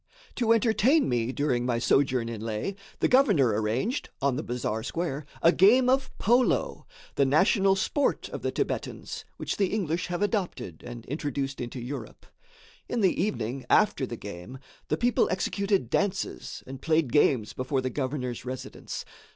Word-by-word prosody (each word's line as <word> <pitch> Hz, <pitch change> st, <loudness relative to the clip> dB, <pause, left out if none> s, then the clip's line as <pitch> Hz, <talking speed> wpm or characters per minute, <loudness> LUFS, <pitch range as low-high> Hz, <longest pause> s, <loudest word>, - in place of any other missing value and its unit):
To 235 Hz, -3 st, +2 dB
entertain 230 Hz, +6 st, +4 dB
me, 120 Hz, -1 st, 0 dB
during 130 Hz, -3 st, 0 dB
my 120 Hz, -1 st, 0 dB
sojourn 125 Hz, 0 st, +2 dB
in 115 Hz, -2 st, -5 dB
Leh, 110 Hz, -, -2 dB, 0.3 s
the -, -, +4 dB
governor 210 Hz, -, +4 dB
arranged, 110 Hz, -, -1 dB
on 140 Hz, -2 st, +1 dB
the 145 Hz, -, -2 dB
bazaar 120 Hz, -4 st, -3 dB
square, 150 Hz, +1 st, -3 dB, 0.2 s
a 165 Hz, -, +7 dB
game 245 Hz, +9 st, +5 dB
of 265 Hz, 0 st, +1 dB
polo 245 Hz, +4 st, +1 dB, 0.3 s
the 140 Hz, -, +2 dB
national 190 Hz, -, +4 dB
sport 280 Hz, +9 st, 0 dB
of -, -, -6 dB
the -, -, -1 dB
Thibetans, -, -, -4 dB
which -, -, -3 dB
the 195 Hz, -, +2 dB
English 180 Hz, -4 st, -1 dB
have 175 Hz, +2 st, -2 dB
adopted 185 Hz, -, -2 dB
and 120 Hz, -1 st, -8 dB
introduced 140 Hz, -2 st, -3 dB
into 125 Hz, +1 st, -5 dB
Europe. 125 Hz, +4 st, -7 dB, 0.6 s
In 240 Hz, -, -1 dB
the 185 Hz, -3 st, +2 dB
evening, 130 Hz, -, -2 dB
after -, -, +3 dB
the -, -, -6 dB
game, 90 Hz, +10 st, -8 dB, 0.3 s
the -, -, 0 dB
people 245 Hz, 0 st, +2 dB
executed 190 Hz, -, 0 dB
dances 200 Hz, -2 st, -2 dB
and 135 Hz, 0 st, -9 dB
played 160 Hz, -5 st, +1 dB
games 130 Hz, -7 st, +3 dB
before 130 Hz, +1 st, -1 dB
the 130 Hz, 0 st, -2 dB
governor's 130 Hz, -2 st, -3 dB
residence. 130 Hz, 0 st, -6 dB
145 Hz, 160 wpm, -27 LUFS, 125-200 Hz, 0.6 s, a